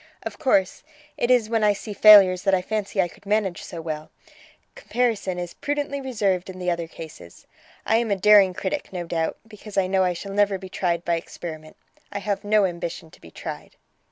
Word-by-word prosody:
Of - - -7
course, 195 -7 +1 0.3
it 240 - -1
is 245 -4 +4
when 225 -1 0
I 210 -1 +4
see 205 +1 -7
failures 195 -3 +8
that 195 0 +3
I 180 - -1
fancy 210 -1 -3
I 180 - +3
could 195 - -18
manage 205 -4 0
so 165 -2 -8
well: 155 -1 -5 0.6
comparison 235 - -1
is 175 -1 -5
prudently 285 -1 -3
reserved 200 -8 -1
in 185 - -8
the 180 -1 -1
other 170 -1 -3
cases. 155 - -12 0.4
I 220 - +3
am 230 -1 0
a 200 - +2
daring 195 -1 +5
critic, 295 +4 -3
no 180 -2 -4
doubt, 165 -1 -2
because 210 -1 -11
I 195 - +3
know 190 0 +2
I 180 -1 +1
shall 195 +3 -7
never 205 -1 +2
be 190 0 -10
tried 175 -2 -1
by 170 -1 +1
experiment. 155 -2 -9 0.3
I - - -4
have 200 0 -2
no 210 -1 +3
ambition 170 -2 -5
to - - -19
be 80 - -13
tried." - - -8
195 Hz, 205 wpm, -24 LUFS, 175-215 Hz, 0.6 s, failures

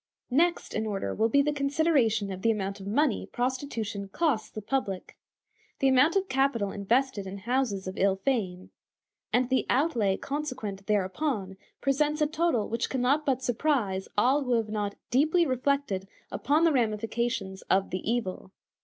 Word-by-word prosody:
Next 340 +6 +1
in 220 0 -1
order 200 -2 -2
will 220 +2 +1
be 280 +5 +4
the 295 +1 0
consideration 275 -8 +1
of 190 0 -6
the 230 - +2
amount 200 -2 -1
of 195 - -8
money 260 +3 +1
prostitution 245 -5 -3
costs 260 - 0
the - - -7
public. 205 -4 -3 0.6
The 270 - +3
amount 265 +6 +4
of 390 -1 +1
capital 265 - +1
invested 220 0 0
in 190 +1 -6
houses 230 -2 -1
of 185 0 -5
ill 195 0 +3
fame, 195 -4 -2 0.6
and 250 0 +2
the 260 +1 +1
outlay 240 -9 +2
consequent 255 -10 -5
thereupon 205 0 -1 0.3
presents 295 +2 +1
a 300 - +4
total 310 -7 0
which 230 +2 -2
can 260 - -1
not 285 +4 +2
but 260 -1 +1
surprise 235 -7 0
all 265 +6 +3
who 250 - +1
have 225 -2 +1
not 205 -2 -2 0.2
deeply 315 +7 +3
reflected 260 -7 0 0.2
upon 300 +3 +1
the 335 - +5
ramifications 225 -3 -1
of 195 +1 +2
the 185 - -1
evil. 195 -6 -3
240 Hz, 160 wpm, -28 LUFS, 200-280 Hz, 0.6 s, the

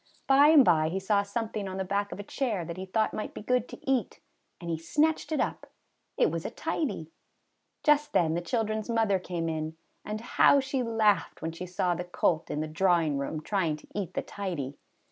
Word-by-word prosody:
By 275 +2 +6
and 300 -4 +7
by 160 -2 +4
he 190 +3 -2
saw 200 +1 +2
something 210 0 -3
on 190 0 -5
the 190 - -1
back 200 +2 -1
of - - -7
a - - -4
chair 210 -6 -2
that 170 0 -6
he 190 +1 -6
thought 215 +3 +1
might 215 - -5
be - - -7
good 250 +1 +1
to - - -9
eat, 260 -6 0 0.4
and 170 - -8
he 165 - -1
snatched 310 - +1
it 310 - 0
up. - - -2 0.5
It - - +3
was - - -3
a - - -3
tidy! 195 - -3 0.7
Just 295 -1 +3
then 160 -2 +2
the 170 - -1
children's 215 +3 -2
mother 220 -4 +2
came 175 -2 -3
in, 160 0 -3 0.3
and 210 +1 -4
how 245 +4 +4
she 270 -1 -1
laughed 225 -3 +1
when 165 - -2
she 175 +3 -7
saw 180 0 0
the 175 - -3
colt 175 -2 0
in 150 - -2
the 155 - -2
drawing 165 -3 +2
room 150 +3 -3
trying 170 -3 0
to 150 - -15
eat 200 -5 -4
the - - -1
tidy! 170 -9 -4
195 Hz, 215 wpm, -29 LUFS, 165-225 Hz, 0.7 s, and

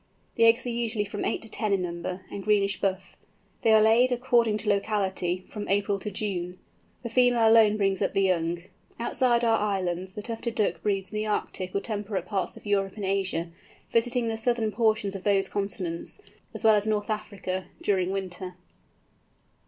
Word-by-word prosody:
The 230 - +4
eggs 230 +3 +4
are - - -2
usually 230 -3 -1
from 205 0 -5
eight - - -1
to - - -9
ten 215 -1 -2
in 190 -2 +1
number, 180 +2 -5
and 200 - -6
greenish 200 -1 +2
buff. 190 -1 -2 0.5
They 225 - +3
are 215 -1 +6
laid, 235 +4 +5
according 240 -3 +2
to 215 0 -2
locality, 195 -3 0
from 210 -1 -6
April 200 0 +1
to 210 - -4
June. 185 -3 -3 0.5
The 235 - -4
female 245 -1 +4
alone 220 -2 +6
brings 195 -2 +1
up - - 0
the 195 - +3
young. 170 -2 0 0.4
Outside 240 0 +2
our 225 -1 +3
islands, 185 -3 -2
the 210 - -6
Tufted 230 0 -4
Duck 215 - 0
breeds 195 -2 -1
in 215 - -4
the 215 0 -1
Arctic 185 -3 -3
or 200 - +1
temperate 205 -4 -3
parts 195 0 -2
of - - -14
Europe 195 -2 0
and 205 -2 -4
Asia, 190 -4 -1 0.4
visiting 235 +1 +1
the 225 0 -2
southern 225 -1 0
portions 215 -2 +1
of 195 - -6
those 195 -2 +3
continents, 190 - -4 0.3
as - - -6
well 220 -1 +7
as 210 0 +2
North 210 0 0
Africa, 195 -3 -3 0.2
during 185 -3 +1
winter. 185 -1 -4
205 Hz, 185 wpm, -27 LUFS, 190-225 Hz, 0.5 s, well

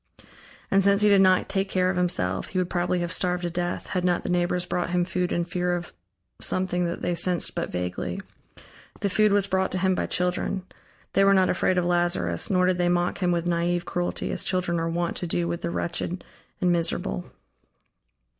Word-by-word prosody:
And 195 0 +4
since 200 +1 +4
he 210 - +5
did 200 -1 +6
not 185 -1 +4
take 195 0 -1
care 185 -1 +1
of - - -4
himself, 135 - +1
he 190 - -5
would 180 -1 0
probably 175 0 0
have 175 0 -2
starved 180 -1 0
to 175 - -2
death, 175 +1 -3
had 180 - -1
not 175 -1 +1
the - - -2
neighbors 180 0 0
brought 180 -1 -2
him 175 0 +1
food 180 0 -2
in 170 0 0
fear 180 +1 -1
of 175 0 -6 0.5
something 180 -1 0
that 170 0 -4
they 175 - 0
sensed 175 0 +1
but - - -3
vaguely. 90 0 -3 0.8
The 200 - +1
food 210 +2 +3
was 200 -1 +3
brought 190 -1 0
to - - 0
him 190 +1 +2
by - - -1
children; 180 +1 -1 0.5
they 195 - +4
were 195 0 +5
not 190 -1 +4
afraid 185 +1 +1
of 180 - +2
Lazarus, 175 - +1
nor 180 -2 +3
did 180 -1 +1
they 175 0 +2
mock 175 0 0
him 180 -2 +1
with 170 0 0
naive 175 0 0
cruelty, 175 0 -2
as - - -3
children 180 -2 0
are 165 0 -1
wont 170 +1 -1
to 175 - -2
do 170 +1 -1
with 170 0 -3
the 170 - -2
wretched 170 +1 -3 0.4
and 180 -1 +2
miserable. 165 - -1
180 Hz, 210 wpm, -25 LUFS, 175-185 Hz, 0.8 s, did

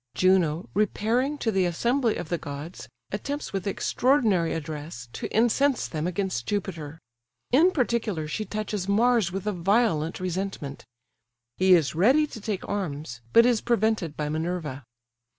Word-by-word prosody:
Juno, 180 -3 +2
repairing 230 +7 +1
to 225 - 0
the 190 -2 +2
assembly 235 +7 +1
of 155 - -5
the 175 - -1
gods, 145 +5 -8 0.2
attempts, 280 +8 -4
with 195 +1 -3
extraordinary 215 - +2
address, 150 -5 -6
to - - -4
incense 240 +4 +2
them 155 +1 -3
against 180 -9 -2
Jupiter; 165 -7 -3 0.5
in 310 +9 +6
particular 230 - -1
she 185 +8 -3
touches 210 -2 -4
Mars 225 -2 +3
with 195 +2 -4
a 210 - +1
violent 180 -3 +1
resentment; 180 - -4 0.7
he 185 0 +6
is 160 -5 +1
ready 255 - +4
to 225 -7 -10
take 205 -2 -3
arms, 150 -10 -4
but 230 - +7
is 245 -3 +3
prevented 220 -8 0
by 150 - -2
Minerva. 155 -4 -3
190 Hz, 145 wpm, -26 LUFS, 160-225 Hz, 0.7 s, but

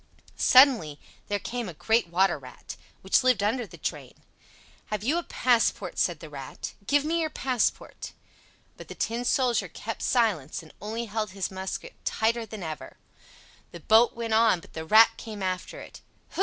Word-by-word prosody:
Suddenly 250 - +5 0.3
there 205 - 0
came 235 +1 -4
a 170 - -9
great 225 +5 +1
water 175 -1 +2
rat, 130 -2 -10 0.3
which 190 - +3
lived 250 -6 +3
under 225 +2 0
the - - -13
drain. - - -5 0.7
"Have 210 -1 -3
you 300 +9 +1
a - - -5
passport?" 230 - +1
said 170 -4 0
the - - -8
Rat. 135 -2 -7
"Give 290 0 +3
me 335 +2 0
your 315 - -1
passport." 255 -5 -2 0.6
But - - -11
the - - -9
Tin 230 +2 -2
Soldier 245 -1 +1
kept - - -7
silence, 190 - 0
and 155 - -16
only 225 +3 -4
held 215 -2 -3
his 195 - -2
musket 190 - -5
tighter 230 0 0
than 215 -4 -8
ever. 155 -2 -7 0.7
The 170 - -9
boat 220 +7 +4
went 230 -1 -3
on, 220 -4 +4
but 195 - -17
the 160 0 -6
Rat 220 +6 +7
came 210 -3 -7
after 185 -1 -3
it. - - -12 0.3
Hu! - - -9
220 Hz, 175 wpm, -27 LUFS, 185-240 Hz, 0.7 s, Rat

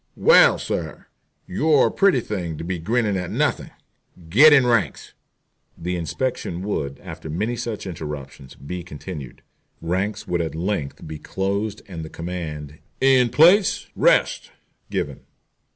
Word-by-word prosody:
Well, 485 - +6
sir, - - -4 0.4
you're 155 -4 +3
a - - +1
pretty 195 -10 +3
thing 90 -8 -4
to - - -6
be 90 +1 -3
grinning 105 +2 0
at 90 -2 -4
nothing. - - -1 0.6
Get 140 - +8
in 140 -4 +6
ranks." 115 - 0 0.6
The 90 +2 -3
inspection 90 0 -3
would, 70 -9 -3
after 80 - -9
many 105 +10 -2
such 115 -3 -5
interruptions, 75 -6 -7
be 90 +6 -6
continued. 75 -4 -9 0.4
Ranks 95 +5 -2
would 85 -1 0
at 80 -2 -4
length 85 -4 -3
be 75 -1 -7
closed 100 +5 -3
and 85 -4 -7
the 80 - -8
command, 80 -4 -6 0.2
"In 130 -2 +4
place, 180 - +4
rest!" - - +2 0.4
given. - - -3
95 Hz, 135 wpm, -22 LUFS, 80-120 Hz, 0.6 s, Get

